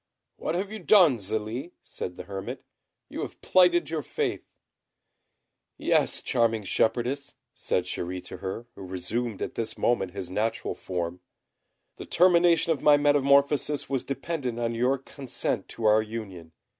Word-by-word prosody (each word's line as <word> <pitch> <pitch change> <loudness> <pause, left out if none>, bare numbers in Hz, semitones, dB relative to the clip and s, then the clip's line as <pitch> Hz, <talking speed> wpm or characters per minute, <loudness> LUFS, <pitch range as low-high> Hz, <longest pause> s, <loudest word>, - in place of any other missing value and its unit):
"What 160 - -2
have 195 +3 -2
you 220 - -5
done, 175 - +5
Zélie?" 110 - -4
said 90 - -6
the - - -7
hermit. 95 -1 -6 0.4
"You - - -6
have - - -6
plighted 175 -3 +4
your 160 -2 -1
faith." - - -2 1.3
"Yes, - - +2
charming 115 -2 +1
shepherdess," 125 +7 0 0.2
said 90 - -1
Chéri 90 0 -4
to - - -7
her, 100 +5 -5
who 100 - -12
resumed 95 +5 -3
at - - -4
this 115 -1 -3
moment 95 -7 +1
his 95 -3 -6
natural 110 +3 -1
form, 90 -1 -4 0.8
"the - - -8
termination 170 -2 +4
of 150 - 0
my 150 -1 +6
metamorphosis 145 0 +3
was 135 -2 0
dependent 135 -3 -3
on 115 0 -1
your 125 +4 +2
consent 135 0 -3
to 115 - -6
our 110 0 +6
union. 100 -7 -7
120 Hz, 145 wpm, -27 LUFS, 100-145 Hz, 1.3 s, my